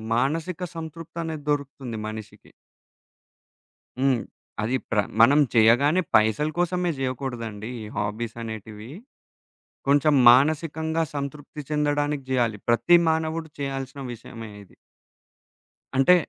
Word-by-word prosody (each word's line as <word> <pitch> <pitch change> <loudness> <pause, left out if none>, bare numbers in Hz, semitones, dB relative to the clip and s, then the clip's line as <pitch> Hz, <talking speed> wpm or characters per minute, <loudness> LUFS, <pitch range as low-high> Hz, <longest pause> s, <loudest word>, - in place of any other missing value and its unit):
మానసిక 155 +8 -1 0.2
సంతృప్తనేది 160 -1 -6
దొరుకుతుంది 140 -5 -2
మనిషికి. 110 -1 -9 1.5
హ్మ్. 130 -2 +3 0.4
అది 120 +4 0
ప్ర 110 - -1 0.2
మనం 140 +6 +7
చెయ్యగానే 120 +9 +5
పైసల 110 +8 +3
కోసమే 175 0 +1
జెయ్యకూడదండి 120 -5 -4
ఈ - - -7
హాబీసనేటివీ, 110 +1 -5 1.0
కొంచెం 145 +2 +4 0.2
మానసికంగా 160 +4 +3
సంతృప్తి 145 +2 -5
చెందడానికి 145 -1 0
జెయ్యాలి. 120 -5 +1
ప్రతి 120 +9 +5
మానవుడు 160 0 -1
చెయ్యాల్సిన 135 0 -4
విషయమే 115 -1 -9
ఇది. 95 - -21 1.2
అంటే, 135 +7 +6
140 Hz, 90 wpm, -25 LUFS, 115-155 Hz, 1.5 s, మనం